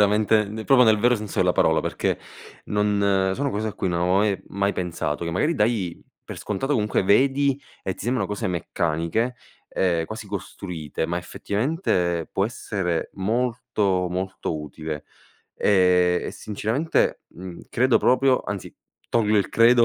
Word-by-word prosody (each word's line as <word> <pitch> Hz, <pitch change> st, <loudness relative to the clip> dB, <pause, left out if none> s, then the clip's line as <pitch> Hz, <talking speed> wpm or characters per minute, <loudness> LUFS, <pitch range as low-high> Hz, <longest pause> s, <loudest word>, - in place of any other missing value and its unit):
veramente 105 Hz, +1 st, +3 dB, 0.2 s
proprio 130 Hz, 0 st, +6 dB
nel 110 Hz, -3 st, +5 dB
vero 120 Hz, +3 st, +4 dB
senso 105 Hz, -2 st, -5 dB
della 90 Hz, -1 st, +4 dB
parola, -, -, +3 dB
perché -, -, -1 dB, 0.5 s
non 100 Hz, -2 st, +2 dB
sono 140 Hz, +1 st, -1 dB
cose 110 Hz, 0 st, -2 dB
a 105 Hz, -, -6 dB
cui 95 Hz, -, -2 dB
non 85 Hz, -1 st, -1 dB
avevo 90 Hz, +2 st, +2 dB
mai 100 Hz, -1 st, +1 dB
mai 100 Hz, +1 st, 0 dB
pensato. 85 Hz, -3 st, -3 dB
Che 85 Hz, -, -2 dB
magari 150 Hz, -, +1 dB
dai 105 Hz, -, 0 dB, 0.2 s
per -, -, -8 dB
scontato 110 Hz, +8 st, -2 dB
comunque 105 Hz, -7 st, +1 dB
vedi 135 Hz, +6 st, +3 dB, 0.2 s
e 95 Hz, -, -2 dB
ti -, -, -9 dB
sembrano 125 Hz, +2 st, 0 dB
cose 105 Hz, -1 st, -3 dB
meccaniche, 85 Hz, +6 st, -1 dB, 0.3 s
ehm, 85 Hz, -3 st, +1 dB
quasi 110 Hz, +2 st, -7 dB
costruite. 90 Hz, -6 st, -5 dB
Ma 85 Hz, +1 st, -1 dB
effettivamente 90 Hz, -, -1 dB
può 95 Hz, -, +1 dB
essere 95 Hz, -7 st, -3 dB
molto, 110 Hz, -3 st, 0 dB
molto 90 Hz, -3 st, -3 dB
utile. 75 Hz, 0 st, -6 dB, 0.5 s
Ehm, 90 Hz, -2 st, +3 dB
e -, -, -4 dB
sinceramente, 110 Hz, +9 st, -1 dB
mhmm, 90 Hz, -1 st, -9 dB
credo 130 Hz, +1 st, +3 dB
proprio 130 Hz, +1 st, +3 dB
anzi, 100 Hz, -2 st, -6 dB, 0.4 s
tolgo 110 Hz, -2 st, +2 dB
il 100 Hz, -, +2 dB
credo 115 Hz, +1 st, +6 dB
100 Hz, 150 wpm, -24 LUFS, 90-115 Hz, 0.5 s, proprio